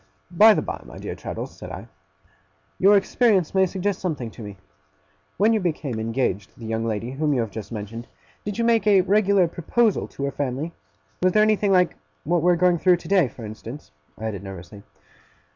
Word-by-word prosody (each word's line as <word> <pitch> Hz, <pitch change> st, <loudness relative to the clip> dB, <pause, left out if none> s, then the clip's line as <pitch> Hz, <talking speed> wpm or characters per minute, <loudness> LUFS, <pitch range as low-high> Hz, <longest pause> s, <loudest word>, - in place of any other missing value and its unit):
'By 210 Hz, +5 st, +7 dB
the -, -, -1 dB
by, -, -, -5 dB
my -, -, -12 dB
dear -, -, -5 dB
Traddles,' -, -, -7 dB
said -, -, -9 dB
I, -, -, -8 dB, 0.9 s
'your 200 Hz, +2 st, +6 dB
experience 200 Hz, -3 st, +2 dB
may 190 Hz, -1 st, +4 dB
suggest 190 Hz, +1 st, -2 dB
something 145 Hz, -11 st, -3 dB
to -, -, -12 dB
me. 100 Hz, -2 st, -8 dB, 0.8 s
When 215 Hz, +3 st, +4 dB
you 220 Hz, -, +2 dB
became 155 Hz, -, -2 dB
engaged 110 Hz, -3 st, -1 dB
to -, -, -26 dB
the 115 Hz, -, -8 dB
young 110 Hz, 0 st, -2 dB
lady 115 Hz, +2 st, -3 dB
whom 150 Hz, +2 st, 0 dB
you 125 Hz, -, +1 dB
have 115 Hz, -2 st, -4 dB
just 105 Hz, -1 st, -8 dB
mentioned, 115 Hz, +2 st, -6 dB, 0.4 s
did 205 Hz, 0 st, -4 dB
you 235 Hz, -, 0 dB
make 230 Hz, -2 st, +2 dB
a 200 Hz, -2 st, +6 dB
regular 200 Hz, -1 st, +3 dB
proposal 200 Hz, +6 st, 0 dB
to 140 Hz, -, -8 dB
her 140 Hz, -, -1 dB
family? 145 Hz, +4 st, -3 dB, 0.5 s
Was 185 Hz, 0 st, +3 dB
there 215 Hz, -, +5 dB
anything 215 Hz, -2 st, +2 dB
like 180 Hz, -2 st, +3 dB, 0.3 s
what 170 Hz, +2 st, +1 dB
we 180 Hz, +2 st, +4 dB
are -, -, +4 dB
going 175 Hz, 0 st, +3 dB
through 180 Hz, 0 st, +4 dB
today, 175 Hz, -2 st, +2 dB
for 115 Hz, -1 st, -10 dB
instance?' 110 Hz, -, -9 dB, 0.3 s
I 110 Hz, -, -6 dB
added, 105 Hz, -4 st, -4 dB
nervously. 95 Hz, 0 st, -10 dB
165 Hz, 200 wpm, -23 LUFS, -, 0.9 s, By